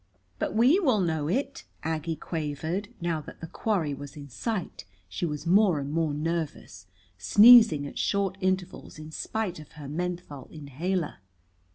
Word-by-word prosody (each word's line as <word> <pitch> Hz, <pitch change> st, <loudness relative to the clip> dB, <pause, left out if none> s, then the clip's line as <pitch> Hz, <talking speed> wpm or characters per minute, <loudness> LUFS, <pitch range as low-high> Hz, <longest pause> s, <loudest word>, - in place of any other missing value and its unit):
"But -, -, -2 dB
we 255 Hz, -, +5 dB
will 260 Hz, -, +2 dB
know 160 Hz, -5 st, 0 dB
it," 270 Hz, -, -2 dB, 0.2 s
Aggie 160 Hz, 0 st, -2 dB
quavered. 160 Hz, +5 st, -3 dB
Now 170 Hz, -2 st, -1 dB
that -, -, -12 dB
the -, -, -6 dB
quarry 165 Hz, -4 st, -1 dB
was 140 Hz, 0 st, -9 dB
in 140 Hz, -1 st, -9 dB
sight 195 Hz, -, -4 dB, 0.2 s
she 90 Hz, -, -3 dB
was 150 Hz, 0 st, -5 dB
more 185 Hz, -1 st, +4 dB
and 140 Hz, 0 st, -4 dB
more 160 Hz, -1 st, 0 dB
nervous, 155 Hz, -, -4 dB, 0.3 s
sneezing 210 Hz, -, +7 dB
at 140 Hz, -, -7 dB
short 200 Hz, -2 st, 0 dB
intervals 185 Hz, -2 st, -2 dB
in 155 Hz, 0 st, -9 dB
spite 190 Hz, 0 st, -3 dB
of 155 Hz, -, -13 dB
her 150 Hz, -2 st, -9 dB
menthol 170 Hz, -3 st, -5 dB
inhaler. 155 Hz, +4 st, -3 dB
165 Hz, 155 wpm, -27 LUFS, 150-195 Hz, 0.3 s, sneezing